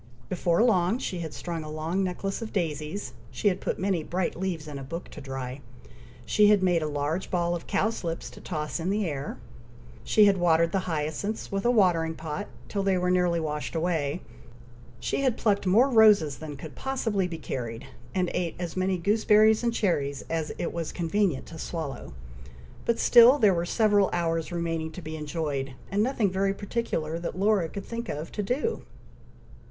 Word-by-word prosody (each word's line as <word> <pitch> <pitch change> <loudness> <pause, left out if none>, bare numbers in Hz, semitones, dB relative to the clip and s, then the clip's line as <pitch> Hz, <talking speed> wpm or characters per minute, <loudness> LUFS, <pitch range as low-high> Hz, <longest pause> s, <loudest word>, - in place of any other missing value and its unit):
Before 175 +1 +2
long 195 -2 +3
she 185 -8 -4
had 160 -2 -4
strung 170 -1 -5
a 155 - -7
long 160 +5 -1
necklace 195 +3 -3
of 225 - -5
daisies 155 -4 -3 0.2
she 205 - +1
had 190 -1 -3
put - - -2
many 190 -3 0
bright 175 +2 -2
leaves 175 -4 -3
in 145 -2 -6
a - - -7
book 165 +6 -6
to 150 - -10
dry 135 -1 -5 0.6
she 210 -1 +4
had 205 -2 +5
made 175 -3 +3
a 155 - -1
large 150 +5 -2
ball 175 -1 +1
of 170 - -5
cowslips 185 -6 -1
to - - -13
toss 155 -2 -3
in 170 +3 -2
the 205 +1 +1
air 145 -4 -4 0.7
she 215 - +5
had 200 -1 +4
watered 170 -1 +3
the 185 -1 -1
hyacinths, 160 +7 -3
with 195 +1 -2
a - - +5
watering 175 -8 +3
pot, 160 +6 -5 0.2
till 200 - -2
they 195 -1 +2
were 180 0 +1
nearly 180 -2 +2
washed 150 0 -3
away 160 -2 0 0.8
she - - -1
had 260 -4 +1
plucked 200 -3 +1
more 225 +9 +5
roses 210 - +5
than 150 -2 -7
could 155 +2 -9
possibly 225 -8 -1
be 170 -2 -5
carried, 120 -4 -5 0.3
and 180 -2 0
eat 175 -2 -1
as 175 -2 -5
many 185 0 +1
gooseberries 215 +3 +4
and 235 - +2
cherries 145 - 0
as 160 -1 -1
it 170 - -3
was 165 -2 -3
convenient 175 -3 0
to 160 - -10
swallow, 155 - -5 0.7
but 235 - +2
still 240 +4 +7
there 210 -7 +5
were 170 0 -1
several 205 -2 +3
hours 165 -2 -1
remaining 165 -2 -2
to 180 - -8
be 155 0 -5
enjoyed, 150 -4 -3 0.2
and 200 +1 +2
nothing 225 -4 +1
very 195 +1 +1
particular, 195 -7 -2
that 170 +1 -5
Laura 195 -4 +2
could 200 +3 -7
think 235 0 -5
of, 155 +3 -4
to 210 - -3
do. 260 - -1
175 Hz, 190 wpm, -27 LUFS, 160-200 Hz, 0.8 s, still